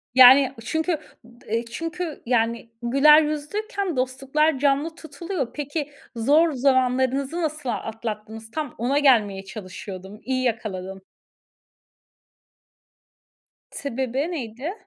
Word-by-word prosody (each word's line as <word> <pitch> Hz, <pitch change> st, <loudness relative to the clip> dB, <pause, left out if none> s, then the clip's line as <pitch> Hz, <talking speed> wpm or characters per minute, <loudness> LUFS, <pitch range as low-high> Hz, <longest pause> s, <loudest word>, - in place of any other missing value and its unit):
Yani, 260 Hz, +1 st, +8 dB
çünkü 320 Hz, +4 st, 0 dB, 0.3 s
d 235 Hz, +1 st, -19 dB
eee, 230 Hz, +1 st, -1 dB
çünkü, 330 Hz, +6 st, -5 dB
yani, 230 Hz, -1 st, 0 dB
güler 275 Hz, +6 st, +6 dB
yüzlüyken 360 Hz, +6 st, -3 dB
dostluklar 270 Hz, +4 st, +1 dB
canlı 285 Hz, +3 st, +1 dB
tutuluyor. 315 Hz, -2 st, -5 dB
Peki, 295 Hz, 0 st, -4 dB, 0.2 s
zor 295 Hz, +8 st, +4 dB
zamanlarınızı 260 Hz, +3 st, +1 dB
nasıl 305 Hz, -4 st, -3 dB
atlattınız? 220 Hz, -1 st, -5 dB
Tam 300 Hz, -3 st, -4 dB
ona 260 Hz, +5 st, +1 dB
gelmeye 210 Hz, -9 st, +3 dB
çalışıyordum. 190 Hz, 0 st, -8 dB
İyi 255 Hz, +2 st, -1 dB
yakaladın. 195 Hz, -5 st, -3 dB, 2.7 s
Sebebi 265 Hz, +3 st, -2 dB
neydi? 265 Hz, -, -5 dB
265 Hz, 95 wpm, -24 LUFS, 230-305 Hz, 2.7 s, Yani